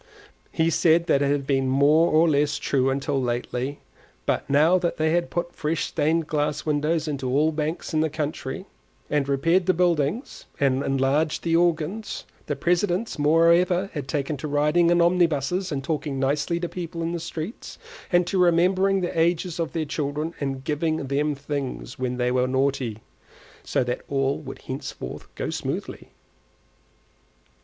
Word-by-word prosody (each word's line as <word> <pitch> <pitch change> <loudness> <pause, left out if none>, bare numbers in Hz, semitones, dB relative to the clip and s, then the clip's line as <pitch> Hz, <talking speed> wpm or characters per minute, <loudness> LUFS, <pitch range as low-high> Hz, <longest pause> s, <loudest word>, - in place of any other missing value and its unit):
He 165 +1 +1
said 165 +1 +3
that 140 - +2
it 140 - +2
had 140 -1 0
been 135 -1 +1
more 145 +5 +4
or 160 +2 +5
less 145 -1 +2
true 135 -2 +1
till 140 -1 -1
lately; 125 +3 -3 0.4
but - - 0
that - - -28
now 160 +6 +5
they 160 -3 0
had 170 +1 +1
put 175 0 -3
fresh 155 +1 -1
stained 160 +1 0
glass 150 -1 -1
windows 155 +2 0
into 135 -4 -3
all 150 +5 +3
the 155 - -10
banks 155 +3 -3
in 155 - +2
the 160 - +1
country, 150 +3 -4 0.5
and 145 -2 +1
repaired 165 +7 +2
the 185 - +3
buildings, 175 - 0
and 135 -1 +2
enlarged 135 +3 +1
the 165 -1 +1
organs; 175 +5 0 0.2
the - - -1
presidents, 180 +3 0
moreover, 170 +5 +3
had 145 -5 -5
taken 145 +1 -2
to 150 - -5
riding 150 +4 +3
in 175 0 +4
omnibuses 175 0 +1
and 135 -2 -2
talking 145 -2 -2
nicely 145 +5 0
to 175 - -2
people 170 -1 -5
in 165 - -1
the 170 - -3
streets, 165 +5 -6 0.3
and 175 0 +4
to 185 +2 -1
remembering 185 +3 +3
the 175 -2 -2
ages 170 +1 +1
of 165 - -2
their 160 -2 -1
children, 150 +2 -3
and 135 -2 -3
giving 155 +2 0
them 145 +2 0
things 140 -2 -5
when 125 -1 -2
they 125 0 +1
were 125 0 +2
naughty, 130 -4 0 0.7
so - - 0
that 125 0 -3
all 135 0 0
would 135 -3 -9
henceforth 135 - -6
go - - -3
smoothly. - - -5
155 Hz, 165 wpm, -24 LUFS, 140-170 Hz, 0.7 s, or